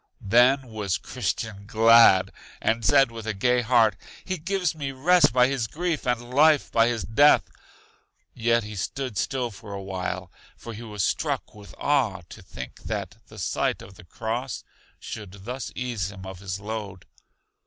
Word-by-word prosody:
Then 125 +6 +4
was 105 -6 -2
Christian 105 -2 -4
glad, 115 -3 +6 0.3
and 115 +1 0
said 135 0 +4
with 115 -1 -8
a 110 - -2
gay 125 +5 +2
heart: 115 -3 +3 0.3
He 185 -2 -3
gives 180 0 -1
me 145 -4 -4
rest 165 +4 +4
by 125 +1 +5
his 130 -3 -1
grief, 165 +2 -3
and 120 0 -2
life 150 +1 +4
by 115 0 +4
his 120 -2 -1
death. 145 +7 +4 0.8
Yet 115 -1 +1
he 105 +1 -8
stood 125 +5 -4
still 125 +4 -1
for 100 0 -10
a 100 - -6
while, 95 -1 -4 0.3
for 115 - -9
he 110 - -9
was 105 -4 -4
struck - - -2
with 105 -1 -13
awe 120 -11 +1
to - - -11
think - - -9
that 105 -1 -4
the 110 - -14
sight 95 - -1
of 95 - -13
the 90 - -15
cross 115 +8 -4 0.4
should 100 -3 -9
thus 125 +3 -5
ease 115 -7 -3
him 95 -1 -10
of 95 -1 -8
his 95 0 -5
load. 105 -3 -6
115 Hz, 170 wpm, -25 LUFS, 100-130 Hz, 0.8 s, glad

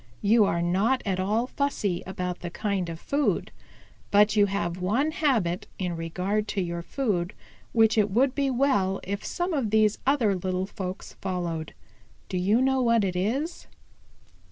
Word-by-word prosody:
You 215 +1 +5
are 170 -3 0
not 200 +9 +1
at 190 -2 -1
all 210 +5 +1
fussy 250 -10 -1
about 180 -1 -4
the 175 - -5
kind 195 -2 -2
of 165 -1 -6
food. 285 +7 0 0.6
But 205 +1 +4
you 205 -1 +5
have 185 -3 -2
one 240 +12 +1
habit 230 - 0
in 180 -2 -2
regard 185 +6 -2
to 200 - -1
your 170 0 -3
food 190 -5 -2 0.4
which 225 -1 +4
it 205 0 +3
would 255 +6 +2
be 280 -1 0
well 240 -8 +1
if 200 +1 -4
some 350 0 -2
of 265 -8 0
these 215 0 +3
other 245 -8 +3
little 185 0 -2
folks 190 -1 -6
followed. 175 -4 -3 0.5
Do 185 - -1
you 205 +7 +3
know 265 0 +2
what 230 -3 +3
it 185 -2 -1
is?" 265 - -2
200 Hz, 165 wpm, -26 LUFS, 180-240 Hz, 0.6 s, You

